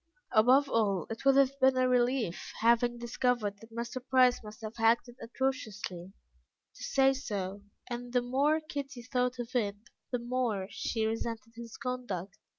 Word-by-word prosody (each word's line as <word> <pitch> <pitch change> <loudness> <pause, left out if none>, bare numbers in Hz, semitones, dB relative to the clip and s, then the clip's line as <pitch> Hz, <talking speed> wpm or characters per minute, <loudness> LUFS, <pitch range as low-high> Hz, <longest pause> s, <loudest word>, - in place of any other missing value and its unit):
Above 255 +6 +5
all, 200 - +1
it 225 - -6
would 275 -1 +5
have 275 0 +3
been 260 -1 +4
a 255 0 +3
relief, 245 -6 +1
having 235 +1 +3
discovered 235 -3 -1
that 225 0 -14
Mr. 235 +2 -4
Price 255 -2 +4
must 215 +1 -11
have 220 +1 -7
acted 235 +2 +2
atrociously, 215 -8 -3 0.6
to - - -11
say 270 0 +3
so, 205 -7 -4 0.3
and 240 0 -5
the 245 0 +2
more 280 +5 +2
Kitty 280 -5 -6
thought 250 0 0
of 240 +1 -6
it, 205 -4 +1 0.3
the 250 - 0
more 240 -5 -1
she 220 -2 -1
resented 230 +1 -3
his 235 -1 -9
conduct. 240 -8 -4
240 Hz, 155 wpm, -31 LUFS, 220-255 Hz, 0.6 s, Above